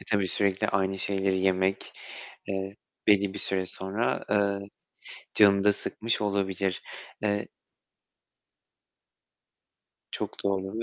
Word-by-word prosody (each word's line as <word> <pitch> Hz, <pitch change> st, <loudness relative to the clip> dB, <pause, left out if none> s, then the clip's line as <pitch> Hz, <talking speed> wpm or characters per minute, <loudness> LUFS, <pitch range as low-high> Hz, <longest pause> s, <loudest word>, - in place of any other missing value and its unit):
E, -, -, -12 dB
tabii 100 Hz, -3 st, +2 dB
sürekli 100 Hz, 0 st, +1 dB
aynı 95 Hz, 0 st, 0 dB
şeyleri 95 Hz, -1 st, +1 dB
yemek, 95 Hz, 0 st, +1 dB, 0.6 s
eee, 95 Hz, 0 st, -3 dB, 0.3 s
belli 100 Hz, -1 st, +4 dB
bir -, -, -4 dB
süre 95 Hz, -1 st, -1 dB
sonra, 95 Hz, +6 st, -1 dB
eee, 100 Hz, -1 st, +1 dB, 0.7 s
canını 100 Hz, -2 st, +6 dB
da 105 Hz, 0 st, +5 dB
sıkmış 115 Hz, +2 st, -2 dB
olabilir. 95 Hz, -2 st, 0 dB, 0.4 s
Eee 105 Hz, -1 st, 0 dB, 2.6 s
Çok -, -, -5 dB
doğru 95 Hz, +2 st, -1 dB
ve. -, -, -1 dB
100 Hz, 110 wpm, -28 LUFS, 95-100 Hz, 2.6 s, canını